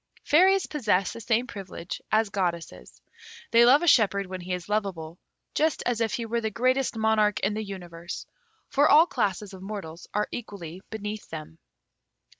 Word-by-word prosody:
Fairies 375 +5 +4
possess 210 -10 0
the 230 - -8
same 230 +2 +1
privilege 190 -6 -7
as 215 -1 +2
goddesses. 170 - -3 0.5
They 235 0 +7
love 275 +6 +6
a - - 0
shepherd 200 - +4
when 185 0 -7
he 180 +1 -7
is 180 -1 -3
loveable, 185 -6 -3 0.3
just 315 0 +1
as 240 -2 0
if 225 -2 0
he 235 - -3
were 235 +1 -1
the 220 - -1
greatest 255 +2 +1
monarch 220 -2 +2
in 200 +2 +1
the 215 +1 -3
universe. 175 -4 -7 0.4
For 285 +2 +3
all 310 +3 +8
classes 205 - -2
of 190 - -10
mortals 190 -5 -7
are 210 0 0
equally 190 -6 -7
beneath 215 -1 -6
them. 160 0 -8
210 Hz, 170 wpm, -26 LUFS, 185-235 Hz, 0.5 s, all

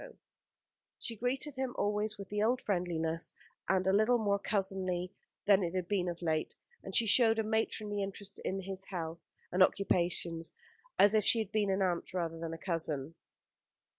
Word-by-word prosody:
She 230 - -6
greeted 260 +5 -1
him 260 -2 -2
always 210 +1 0
with 200 -1 -9
the 210 0 -1
old 240 +4 +2
friendliness 170 -5 -1 0.4
a 190 - +4
little 210 +6 +3
more 200 -3 +1
cousinly 190 -3 -1 0.3
than 200 -1 +5
it 175 0 -2
had 180 -2 -1
been 190 -3 0
of 175 0 -6
late; 155 -1 0 0.3
and 195 - -7
she 230 - +4
showed 225 +1 +5
a 220 - +1
matronly 215 -1 -1
interest 195 0 -6
in 195 +1 -3
his 190 0 -5
health 165 -3 -5 0.3
and 185 - +1
occupations, 175 -3 +1 0.4
as 205 +1 +7
if 215 -1 +4
she 230 - +6
had 220 -3 -2
been 210 -2 +1
an 190 0 +1
aunt 180 0 -1
rather 165 -2 -2
than 165 0 -4
a 165 - -5
cousin. 160 -4 -1
195 Hz, 170 wpm, -32 LUFS, 175-210 Hz, 0.4 s, as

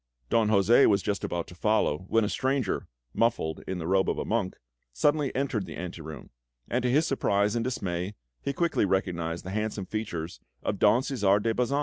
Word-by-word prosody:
Don 110 -2 +3
José 110 +5 +5
was 100 -2 +3
just 100 -1 -1
about 85 -1 -2
to - - -12
follow, 95 -4 +1
when 115 +1 +3
a - - -1
stranger, 130 -4 -1 0.3
muffled 105 -8 0
in 95 - -2
the 85 - -5
robe 95 +2 +2
of - - -1
a - - -2
monk, 105 -4 -1 0.4
suddenly 145 - +2
entered 130 -7 -1
the - - -7
ante 90 -1 -6
room; 80 -1 -9 0.4
and 125 - 0
to 125 - +1
his 150 +6 +3
surprise 105 -6 +1
and 115 - 0
dismay, 95 -5 -3 0.3
he - - -1
quickly 170 +4 +1
recognised 85 -4 -1
the 95 - -5
handsome 105 -1 -2
features 90 -7 -4 0.2
of 100 - -2
Don 115 +5 +5
Cæsar 105 -8 +2
de 115 - +1
Bazan! 125 +4 +1
105 Hz, 200 wpm, -28 LUFS, 90-120 Hz, 0.4 s, José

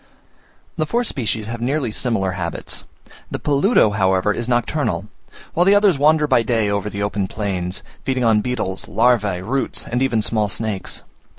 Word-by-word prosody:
The 155 - 0
four 240 +9 +1
species 115 - -2
have 115 +1 -5
nearly 130 -1 0
similar 105 -5 0
habits; 90 -2 -4 0.4
the - - -3
peludo, 145 - +3
however, 95 0 +2
is 120 +2 -3
nocturnal, 120 -1 0 0.5
while 175 - +3
the 195 +2 +5
others 200 -7 +4
wander 150 +1 +4
by 130 -5 +3
day 115 -3 +1
over 100 0 -1
the 100 0 -3
open 100 -1 -1
plains, 95 -4 -3 0.2
feeding 130 -1 -1
on 110 -2 +4
beetles, 105 -6 -3
larvae, 105 -6 +2
roots, 130 +6 -1
and 120 +2 -2
even 120 -5 +1
small 105 -2 +1
snakes. 105 -2 -3
115 Hz, 165 wpm, -20 LUFS, 100-135 Hz, 0.5 s, the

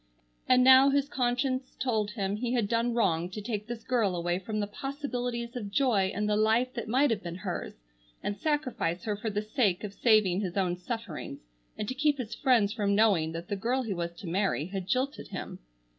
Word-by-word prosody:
And 255 0 +6
now 265 +1 +8
his 280 0 +2
conscience 255 0 -1
told 220 -5 0
him 200 -2 -2
he 240 +2 -2
had 235 -5 +1
done 235 +2 0
wrong 175 -7 +1
to 190 - -6
take 210 0 -4
this 240 -1 -6
girl 225 -7 +1
away 175 +1 -1
from 215 +3 -4
the 205 - 0
possibilities 245 0 -4
of 215 -5 -4
joy 200 -5 +2
in 210 0 -2
the 210 0 +1
life 225 +4 +2
that 235 -3 -5
might 260 +4 +3
have 215 -3 0
been 170 -1 -6
hers, 180 - -5 0.4
and 205 - -2
sacrifice 255 - -1
her 210 -2 -1
for 215 +2 -3
the 210 0 -2
sake 215 -4 +1
of 205 -2 -5
saving 210 -5 +3
his 185 -2 -4
own 180 -2 +1
sufferings, 200 -2 -6 0.4
and 210 - -3
to 255 - -2
keep 290 +2 +2
his 240 -4 -5
friends 230 -7 +3
from 205 -3 +1
knowing 200 -7 +3
that 165 +1 -6
the 205 - -2
girl 245 +6 0
he 220 -4 -2
was 170 -1 -3
to 170 - -9
marry 185 -3 0
had 185 0 -5
jilted 265 +6 -1
him. - - -7
215 Hz, 210 wpm, -29 LUFS, 195-250 Hz, 0.4 s, now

